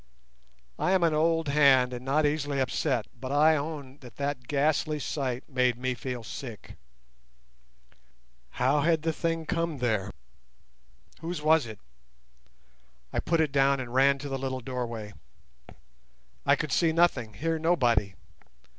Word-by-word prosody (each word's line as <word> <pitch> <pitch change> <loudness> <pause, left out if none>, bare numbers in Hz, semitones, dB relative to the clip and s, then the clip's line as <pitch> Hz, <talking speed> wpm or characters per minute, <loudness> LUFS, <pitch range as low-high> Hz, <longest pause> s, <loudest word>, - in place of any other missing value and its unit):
_ - - -3
I 185 - +3
am 185 -2 +3
an 165 -2 +3
old 165 0 +1
hand 135 -3 +5
and 125 0 -6
not 145 +4 +1
easily 145 -1 0
upset, 130 -2 0
but 130 +2 -7
I 155 +2 +5
own 145 -2 -5
that 125 -2 -13
that 140 -3 -3
ghastly 150 +1 +1
sight 135 -3 -3
made 125 -3 +1
me 130 +1 -1
feel 125 -1 -5
sick. 115 -1 -8 1.8
How 130 +4 +3
had 160 0 +2
the 160 0 0
thing 165 0 -2
come 165 -2 -1
there? 110 -6 0 1.1
Whose 165 -1 -5
was 155 -4 +4
it? 110 -2 -8 1.4
I - - 0
put 165 -1 +1
it 155 -3 0
down 140 0 +3
and 125 -2 -6
ran 135 +1 +4
to 145 +1 -7
the 135 0 -3
little 130 -1 -3
doorway. 120 -4 -5 1.3
I - - +6
could - - -4
see 165 -2 +3
nothing, 140 -10 +1
hear 165 +8 -1
nobody. 120 - +2
140 Hz, 145 wpm, -28 LUFS, 125-155 Hz, 1.8 s, I